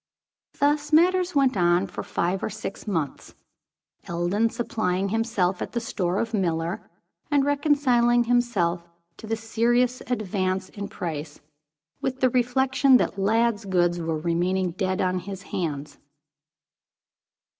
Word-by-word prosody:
Thus 290 +1 +1
matters 360 +2 +3
went 270 -4 +3
on 175 0 +3
for 185 - -6
five 180 +3 -1
or - - -1
six 205 0 -7
months, 165 -8 -3 0.7
Eldon 175 +6 +1
supplying 200 -5 -1
himself 210 -4 0
at - - -5
the 240 - 0
store 185 -5 -2
of 230 +1 -2
Miller, 170 -3 -1 0.4
and 285 -2 +3
reconciling 275 -5 +3
himself 200 -8 0 0.3
to 220 - -10
the 225 +1 -1
serious 240 +3 +1
advance 190 -5 -1
in 200 -1 -6
price, 165 -6 -6 0.6
with 260 0 -2
the 255 -2 +3
reflection 260 +2 +3
that 200 - -1
Lladd's 225 +2 +1
goods 175 -2 +1
were 165 -1 -2
remaining 175 +3 0
dead 185 +1 -1
on 185 0 0
his 195 +1 -8
hands. 150 -6 -4
205 Hz, 130 wpm, -25 LUFS, 180-245 Hz, 0.7 s, matters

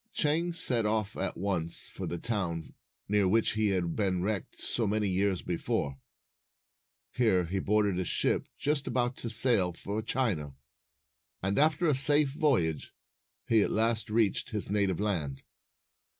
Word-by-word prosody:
Chang 165 +3 +1
set 125 -8 +3
off 110 -1 -1
at 95 - -3
once 85 -4 -2
for - - -6
the 85 - -3
town, 85 -7 -3 0.3
near 105 -1 +2
which 110 +4 +2
he 110 0 +1
had 90 -4 0
been 95 -4 0
wrecked 100 -1 -3
so 115 -3 -1
many 105 0 +1
years 95 0 0
before. 70 -5 -2 1.1
Here 105 -8 +2
he 95 +4 -2
boarded 105 -2 +1
a - - 0
ship - - 0
just 145 -1 -1
about 125 0 0
to 115 - -5
sail 110 -6 +3
for 100 +5 -4
China, 105 - -1 0.9
and, 100 +5 +1
after 155 +3 +3
a 150 - +4
safe 145 +2 +3
voyage, 135 - 0 0.5
he 115 -2 +4
at - - +1
last 110 -1 0
reached 110 -2 +1
his 105 -2 -2
native 100 -4 +1
land. 80 -10 -2
105 Hz, 150 wpm, -30 LUFS, 90-120 Hz, 1.1 s, a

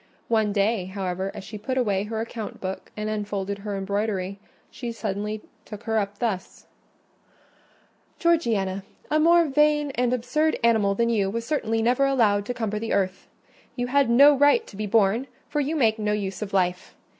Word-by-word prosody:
One 220 -2 +2
day, 200 -1 +1
however, 190 0 -3
as - - -7
she 210 +1 -8
put 260 +5 -3
away 205 -5 +1
her 220 +1 -4
account 225 -1 -6
book 190 0 -6
and 210 0 -3
unfolded 205 -2 -3
her 200 0 -4
embroidery, 200 -1 -2 0.3
she 240 -2 -5
suddenly 210 -1 -4 0.2
took 210 +1 -10
her 225 -1 +1
up 200 0 -3
thus— 205 -6 -3 1.5
"Georgiana, 220 - +1 0.3
a 305 - +3
more 340 +2 +5
vain 295 0 +2
and 245 -2 0
absurd 300 +6 +1
animal 220 -4 +3
than 235 +2 +1
you 205 -4 +1
was 230 +3 -3
certainly 225 -7 0
never 250 +4 +3
allowed 210 -7 +2
to 245 - -1
cumber 215 -3 -2
the 225 +1 -2
earth. 190 -1 -1 0.5
You 245 - -1
had 280 -3 +4
no 280 +5 +7
right 290 - +4
to - - -13
be 210 +1 -3
born, 220 +4 +2 0.2
for 295 - -2
you 295 +3 -1
make 225 -6 +2
no 210 0 0
use 195 -2 -3
of 205 -2 -4
life. 180 -2 -1
220 Hz, 180 wpm, -25 LUFS, 200-245 Hz, 1.5 s, no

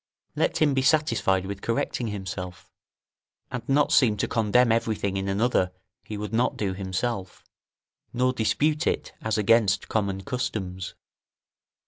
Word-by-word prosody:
Let - - +1
him 145 -2 +3
be 135 - +2
satisfied 115 - +2
with 100 0 -6
correcting 115 +1 -1
himself, 95 -4 -6 0.8
and 125 - -3
not 145 +1 +3
seem 110 -6 +4
to - - 0
condemn 115 +2 +3
everything 110 -4 0
in 95 0 -2
another 100 -2 +1 0.3
he 105 - -6
would 105 +1 -5
not 120 +3 +1
do 100 -3 -1
himself, 95 +1 -3 0.7
nor 125 +1 +1
dispute 150 +7 +1
it - - -1
as 110 -1 -1
against 105 -1 +3
common 100 -3 -1
customs. 95 -7 -4
110 Hz, 135 wpm, -26 LUFS, 95-125 Hz, 0.8 s, seem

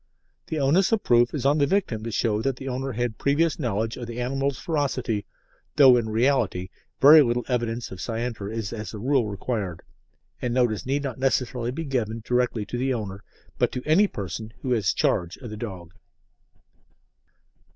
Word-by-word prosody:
The 160 - -3
onus 150 +8 +3
of 225 -2 +1
proof 120 0 +4
is 140 -4 -4
on 145 +2 +4
the 140 - +3
victim 140 - 0
to 115 - -4
show 110 -1 0
that 135 +1 0
the 135 +1 -8
owner 130 +1 -3
had 120 0 -2
previous 155 +4 +1
knowledge 115 -3 -1
of 120 -2 -6
the 120 +1 -6
animal's 135 +2 -1
ferocity, 130 - -2 0.5
though 135 -4 +8
in 115 -2 0
reality 110 -6 +1 0.3
very 150 +3 +9
little 120 -2 0
evidence 120 -2 -2
of 95 - -8
scienter 115 -3 -3
is 110 -2 -4
as 110 0 -6
a - - -5
rule 125 +1 +1
required, 100 -3 -4 0.6
and 125 -1 -1
notice 120 -3 +1
need 140 +2 0
not 130 -3 -4
necessarily 125 -2 0
be 160 +6 -4
given 115 -5 -2
directly 125 -3 0
to 120 +4 -4
the 135 +1 0
owner, 100 -5 -4 0.4
but - - +2
to 125 - -4
any 175 +7 +4
person 105 - -6
who 130 - -2
has 110 -6 +2
charge 85 +1 0
of 120 -5 -9
the - - -5
dog. 95 -6 -7
120 Hz, 180 wpm, -25 LUFS, 110-135 Hz, 0.6 s, very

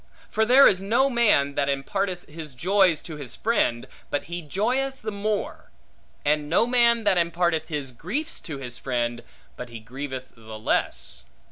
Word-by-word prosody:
For 220 0 +2
there 265 +3 +8
is 185 - +2
no 235 +7 +2
man, 205 - +3
that 140 0 0
imparteth 180 +7 -2
his 150 -3 -8
joys 185 +2 +3
to 160 -3 -7
his 135 -5 -4
friend, 165 - 0 0.2
but 145 - -1
he 175 +3 -5
joyeth 245 - -1
the 215 - -3
more; 205 0 -3 0.6
and 150 0 +1
no 170 - +4
man 235 -1 +4
that 190 -3 +3
imparteth 170 -1 0
his 145 -5 -4
griefs 235 - -4
to 155 -4 -7
his 125 -3 -7
friend, 120 -2 -2 0.3
but 125 - -8
he 115 -1 -8
grieveth 130 +3 -7
the 110 -1 -10
less. 75 -7 -2
165 Hz, 165 wpm, -25 LUFS, 135-215 Hz, 0.6 s, there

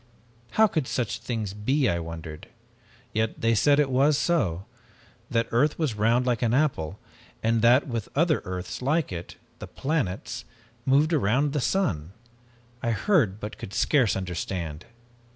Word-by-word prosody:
How 220 - +6
could 155 -10 -1
such 120 -5 -2
things 110 -5 -3
be, 130 +7 +1
I 85 - +1
wondered. 80 -2 -8 0.7
Yet 110 0 -1
they 115 0 +2
said 140 +7 +4
that - - +5
it 135 - -5
was 140 +3 +4
so, 100 - 0 0.6
that 115 -1 +1
earth 140 +6 +2
was 155 -8 0
round 115 +4 +2
like 120 -3 0
an 120 0 +2
apple, 105 - 0 0.5
and 115 0 +2
that 120 +5 +5
with 115 -5 -4
other 155 +1 +2
earths 90 +3 -5
like 150 +1 +1
it, 85 -1 -6 0.2
the - - -7
planets, 135 - -2 0.4
moved 145 +5 +4
round 135 +2 +2
the 145 - 0
sun. 95 - 0 0.7
I 120 - -1
heard, 115 - +2
but 105 0 -7
could 95 - -7
scarce 130 -8 +3
understand. 90 -3 -4
115 Hz, 155 wpm, -26 LUFS, 95-145 Hz, 0.7 s, How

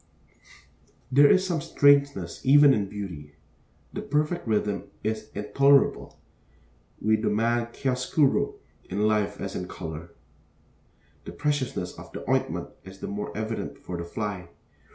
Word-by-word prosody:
There 140 +2 +7
is 190 0 +4
'some 170 -5 -1
strangeness' 140 -14 +2
even 145 +1 +7
'in 100 -5 -1
beauty.' 85 -8 -7 0.6
The - - -4
perfect 150 +1 -1
rhythm 105 -2 0 0.2
is 110 0 -3
intolerable. 135 +7 +2 0.8
We 110 +1 +2
demand 115 +2 0
chiaroscuro 130 +2 +1 0.3
in 100 +3 -3
life 105 -1 0
as - - -5
in 90 - -4
color. 80 -1 -7 1.2
The - - -7
preciousness 145 -11 -2
of - - -12
the - - -7
ointment - - 0
is 95 0 -12
the - - -7
more 100 +1 -4
evident 110 +1 -4
for 90 - -7
the 85 - -4
fly. 90 -1 -5
110 Hz, 130 wpm, -26 LUFS, 100-140 Hz, 1.2 s, There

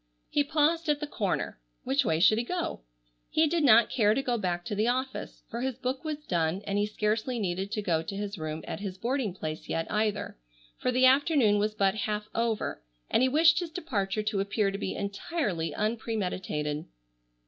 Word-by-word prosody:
He 290 - +3
paused 315 +2 +1
at 295 -1 +2
the 300 - -2
corner. 200 - -2 0.2
Which 275 +2 +2
way 160 -8 +1
should 215 +5 +5
he - - 0
go? 350 +7 -3 0.5
He 315 - +3
did 320 +1 +1
not 230 -4 +6
care 215 -4 +3
to 270 - 0
go 245 -2 0
back 175 -5 -2
to 225 - -3
the 210 +3 +1
office, 260 +2 -2
for 235 - -5
his 260 -1 -1
book 260 0 -3
was 305 -1 -4
done, 170 +2 0
and 200 0 0
he 205 - +1
scarcely 215 +4 -1
needed 190 -1 -2
to 215 -2 -2
go 165 -4 +1
to 165 +5 -6
his 205 0 -3
room 155 0 -4
at - - -4
his 195 -2 -5
boarding 240 0 -1
place 155 -3 -6
yet 165 - -1
either, 210 - -1 0.4
for 250 - +1
the 255 +1 +4
afternoon 265 -6 +4
was 210 +1 0
but 195 -2 +3
half 210 0 -3
over 230 -2 -1 0.3
and - - +4
he 260 - +4
wished 320 +4 +5
his 350 -2 -4
departure 215 - -2
to 210 -1 -1
appear 200 +1 +1
to 195 - -5
be 190 - -3
entirely 200 - -2
unpremeditated. 190 -9 -2
215 Hz, 200 wpm, -29 LUFS, 195-265 Hz, 0.5 s, not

